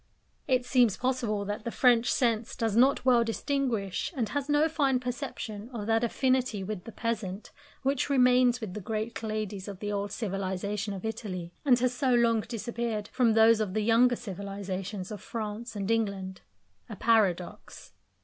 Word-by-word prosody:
It 255 -2 +2
seems 245 -6 +3
possible 240 -5 -1
that 205 +1 -4
the 235 - -3
French 240 -1 +3
sense 230 -2 0
does 225 -2 -1
not 260 +3 +4
well 245 -2 +5
distinguish, 230 -4 -1
and 230 -6 -1
has 285 +4 -3
no 295 +2 +4
fine 280 -5 +1
perception 245 -4 -5
of 210 -3 -4
that 225 +1 +2
affinity 255 -3 +1
with 195 -2 -5
the 230 - -8
peasant 215 -3 -4 0.3
which 275 +1 0
remains 250 -2 +4
with 205 -5 -5
the 210 - -5
great 220 +4 -3
ladies 215 -3 -4
of 200 -2 -6
the 205 +2 -4
old 200 0 -2
civilisation 200 0 -3
of 190 - -7
Italy, 190 -6 -5
and 260 -4 +5
has 250 0 +1
so 255 -1 +2
long 230 -1 +3
disappeared 230 -1 -4
from 245 -3 +2
those 225 0 +6
of 210 -3 -2
the 215 - +1
younger 235 +3 +4
civilisations 195 -2 -5
of 210 - -6
France 225 +1 -5
and 200 +1 -2
England 200 -4 -1 0.5
a 215 - -6
paradox. 200 -5 0
225 Hz, 170 wpm, -29 LUFS, 205-245 Hz, 0.5 s, those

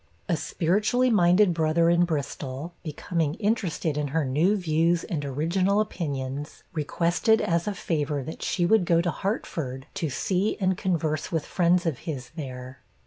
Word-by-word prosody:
A 175 - +2
spiritually 210 - +1
minded 180 -1 +5
brother 165 +1 +2
in 170 +1 +4
Bristol, 145 -1 -4
becoming 155 0 -2
interested 190 -8 -1
in 145 - -1
her 150 +2 0
new 160 +11 +2
views 165 -1 +1
and 150 -4 -3
original 170 +9 +1
opinions, 145 -8 -3
requested 170 +8 +2
as 170 +1 0
a 205 - -1
favor 150 -5 -1
that 160 - -8
she 175 - 0
would 210 0 +4
go 170 -1 +3
to 170 0 +1
Hartford, 140 - -3
to 175 -6 -2
see 190 +8 0
and 190 -1 +2
converse 160 -5 -1
with 160 -3 -1
friends 175 0 +2
of 155 -7 -1
his 130 -6 -6
there. 130 -3 -7
165 Hz, 155 wpm, -26 LUFS, 150-185 Hz, -, minded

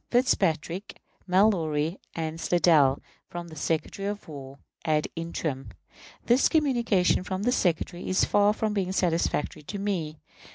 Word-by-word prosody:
Fitzpatrick, 190 - 0 0.3
Mallory, 175 -4 +2 0.2
and 160 0 -4
Slidell, 155 -6 +4 0.3
from 175 0 -7
the 160 - -11
Secretary 165 +6 -2
of 205 0 -5
War 140 -3 -9 0.3
ad 155 -1 +1
interim. 155 -7 -4 0.6
This 245 +3 +4
communication 235 - +2
from 190 +1 -4
the 245 - +2
Secretary 175 -5 -1
is 185 - +3
far 205 0 +4
from 215 -1 -1
being 190 -2 -1
satisfactory 165 -4 0
to 200 +8 -6
me. 180 -6 -2
175 Hz, 130 wpm, -27 LUFS, 155-205 Hz, 0.6 s, Slidell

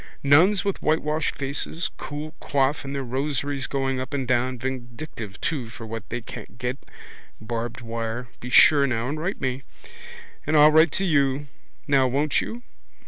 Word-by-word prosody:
Nuns 175 +9 +5
with 200 - -1
whitewashed 155 0 0
faces, 155 +6 -2
cool 150 +2 -6
coifs 140 0 +1
and 135 0 -5
their 135 - -2
rosaries 135 +1 -2
going 135 -1 -1
up 130 +3 -4
and 135 -3 -2
down, 125 +1 +1
vindictive 120 -3 -6
too 135 -8 -2
for 115 - -9
what 110 -1 -7
they 120 +1 -3
can't 115 - -10
get. 125 +1 -3 0.6
Barbed 115 +2 -4
wire. 115 +1 -4
Be 125 - -7
sure 140 +3 +7
now 120 -1 -1
and 155 +2 -3
write 180 +6 -2
to - - -10
me. 130 0 -1 0.8
And 155 - +3
I'll 150 +1 +8
write 160 0 +6
to 195 - +1
you. 140 -4 +2 0.4
Now 135 -2 +4
won't 140 +4 +1
you? 240 +2 -6
135 Hz, 170 wpm, -25 LUFS, 125-150 Hz, 0.8 s, I'll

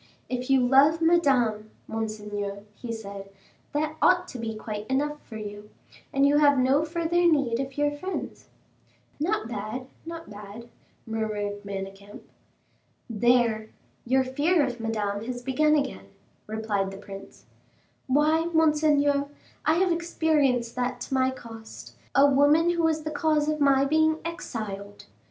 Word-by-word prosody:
"If 250 +1 -3
you 265 -2 +4
love 275 +5 +5
Madame, 265 -11 +2 0.2
monseigneur," 210 -2 -4
he 235 +2 -7
said, 200 -3 -7 0.4
"that 310 +1 -2
ought 360 0 +4
to 255 - -7
be 225 -1 -4
quite 215 -1 -6
enough 295 +3 -1
for 220 - -10
you, 205 0 -8 0.4
and 275 0 +3
you 285 +1 +4
have 290 -2 +5
no 265 +4 +3
further 340 +1 +1
need 255 -6 +1
of 270 0 -4
your 290 0 +2
friends." 370 +6 -6 0.7
"Not 345 - 0
bad, 220 +3 -5 0.2
not 330 0 -8
bad," 210 +3 -10 0.4
murmured 210 -2 -3
Manicamp. 195 +1 -7 0.9
"There, 230 -1 +2 0.3
your 260 +2 +2
fear 290 +5 +2
of 245 -2 -5
Madame 210 -2 -2
has 245 0 -5
begun 300 +4 +3
again," 280 -2 -2 0.4
replied 215 -2 -1
the 195 - -9
prince. 195 -1 -11 0.6
"Why, 305 +4 +3
monseigneur, 300 -3 +3 0.4
I 315 +2 +4
have 365 +1 +2
experienced 300 -8 +1
that 250 0 -1
to - - -5
my 260 0 +3
cost; 225 -4 -10 0.2
a 275 - +7
woman 290 +5 +4
who 340 -1 0
was 320 -1 +1
the 310 - -4
cause 305 0 +1
of 305 0 0
my 275 -1 +4
being 315 +2 +3
exiled!" 215 - -6
260 Hz, 140 wpm, -26 LUFS, 220-305 Hz, 0.9 s, a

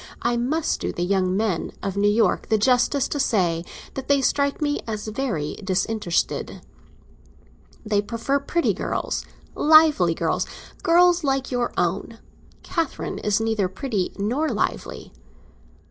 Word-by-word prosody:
I 240 0 +1
must 275 +7 0
do - - -2
the 175 - -3
young 185 0 +1
men 205 -6 -1
of 195 -1 -2
New 205 +1 +3
York 220 +2 +1
the 220 - +4
justice 255 +4 +2
to 290 - -2
say 180 -10 +1 0.3
that 270 - -6
they 280 -1 +4
strike 280 +1 +1
me 290 -1 0
as 215 -2 -4
very 215 - -3
disinterested. 190 -1 -1 1.2
They 210 -1 +2
prefer 230 +6 -1
pretty 335 +4 0
girls—lively 300 - +2
girls—girls 350 - +1
like 270 -2 0
your 245 -1 0
own. 190 +6 -1 0.5
Catherine 330 -5 -3
is 210 +1 +1
neither 220 -3 0
pretty 190 0 -2
nor 250 +10 0
lively." - - -3
230 Hz, 130 wpm, -23 LUFS, 195-280 Hz, 1.2 s, the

